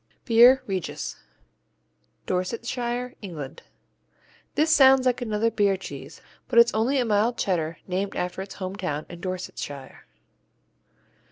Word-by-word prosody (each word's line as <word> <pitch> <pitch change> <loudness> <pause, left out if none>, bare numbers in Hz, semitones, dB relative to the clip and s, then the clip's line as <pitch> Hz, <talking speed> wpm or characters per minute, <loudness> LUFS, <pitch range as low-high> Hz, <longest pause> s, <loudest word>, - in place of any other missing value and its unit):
Beer 245 +3 +6
Regis 190 -3 -4 1.1
Dorsetshire, 240 +6 -2
England 160 -7 -7 0.9
This 315 +1 +3
sounds 270 -3 +6
like 250 0 +1
another 225 -1 0
beer 200 -3 +2
cheese, 190 - -9 0.3
but 235 - -1
it's 235 0 +7
only 235 +6 +1
a 250 - +2
mild 220 +2 +1
Cheddar 165 -4 -1
named 195 +2 -2
after 180 +1 -3
its 195 0 -8
hometown 185 -6 -4
in 175 -1 -10
Dorsetshire. 175 -7 -6
205 Hz, 115 wpm, -25 LUFS, 185-245 Hz, 1.1 s, it's